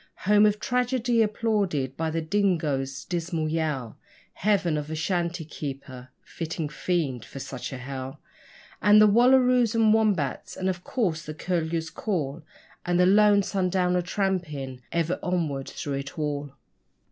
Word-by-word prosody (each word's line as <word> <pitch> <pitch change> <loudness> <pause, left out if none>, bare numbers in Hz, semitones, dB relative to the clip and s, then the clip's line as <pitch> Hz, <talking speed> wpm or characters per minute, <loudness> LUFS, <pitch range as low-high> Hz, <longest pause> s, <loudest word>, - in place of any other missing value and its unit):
Home 210 +1 +6
of 210 0 0
tragedy 245 -1 +1
applauded 205 - 0
by 160 +2 -1
the 165 0 -2
dingoes' 155 -8 0
dismal 170 -2 -2
yell, 155 -7 -2 0.3
Heaven 190 -4 +1
of 150 -1 -3
the 160 - -4
shanty 170 0 -1
keeper 135 -4 -7
fitting 165 -2 -4
fiend 150 -6 -1
for 130 - -11
such 135 -1 -6
a 130 - -5
hell 130 +1 -6 0.6
And 205 +2 +7
the 215 - +8
wallaroos 250 +1 +4
and 220 -1 +5
wombats, 205 -11 0
and, 190 0 -1
of 180 -1 -4
course, 180 -11 -1
the 155 - -7
curlew's 165 -1 -2
call 165 -7 -3 0.4
And 175 0 +1
the 180 - +6
lone 205 +1 +5
sundowner 180 -2 +1
tramping 170 -9 -2
ever 170 +1 0
onward 155 -7 -2
through 145 - -5
it 140 +3 -7
all! 145 -2 -3
170 Hz, 145 wpm, -26 LUFS, 145-205 Hz, 0.6 s, the